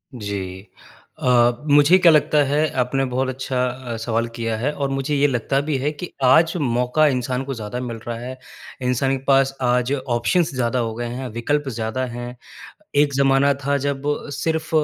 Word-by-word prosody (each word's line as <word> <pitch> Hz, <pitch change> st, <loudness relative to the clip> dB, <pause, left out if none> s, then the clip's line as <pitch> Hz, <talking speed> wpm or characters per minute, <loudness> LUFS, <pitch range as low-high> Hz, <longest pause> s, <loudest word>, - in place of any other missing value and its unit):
जी। 100 Hz, -3 st, -5 dB, 0.5 s
अ, 120 Hz, -1 st, +4 dB, 0.2 s
मुझे 145 Hz, +5 st, +6 dB
क्या 175 Hz, -3 st, +6 dB
लगता 150 Hz, -1 st, +3 dB
है 150 Hz, +3 st, +2 dB
आपने 135 Hz, +2 st, 0 dB
बहुत 130 Hz, +1 st, -1 dB
अच्छा 130 Hz, -1 st, -2 dB
अ, 125 Hz, -1 st, -5 dB
सवाल 115 Hz, +1 st, -1 dB
किया 115 Hz, -1 st, -2 dB
है, 130 Hz, +7 st, -1 dB
और 140 Hz, -2 st, -2 dB
मुझे 135 Hz, +2 st, -1 dB
ये 145 Hz, +1 st, +3 dB
लगता 135 Hz, +1 st, 0 dB
भी 145 Hz, -1 st, -1 dB
है। 140 Hz, +3 st, -1 dB
कि 155 Hz, +4 st, -7 dB
आज 160 Hz, +6 st, +5 dB, 0.6 s
इंसान 125 Hz, 0 st, -1 dB
को 135 Hz, -, -4 dB
ज़्यादा 110 Hz, +1 st, -5 dB
मिल 120 Hz, -2 st, -5 dB
रहा 115 Hz, -1 st, -3 dB
हैं, 130 Hz, +2 st, -7 dB, 0.4 s
इंसान 130 Hz, +2 st, 0 dB
के 130 Hz, -, -13 dB
पास 135 Hz, 0 st, +3 dB
आज 125 Hz, +1 st, +1 dB, 0.2 s
ऑप्शन्स 170 Hz, +3 st, +1 dB
ज़्यादा 125 Hz, 0 st, 0 dB
हो 115 Hz, -2 st, -2 dB
गए 120 Hz, +1 st, -4 dB
हैं, 125 Hz, +2 st, -5 dB
विकल्प 140 Hz, +6 st, -1 dB
ज़्यादा 110 Hz, +4 st, -2 dB
हैं। 120 Hz, +1 st, -6 dB, 0.7 s
एक 145 Hz, -1 st, -2 dB
ज़माना 135 Hz, +1 st, +3 dB
था 140 Hz, 0 st, +2 dB
जब 140 Hz, -1 st, -3 dB, 0.4 s
सिर्फ 160 Hz, -1 st, -1 dB
130 Hz, 180 wpm, -21 LUFS, 120-140 Hz, 0.7 s, मुझे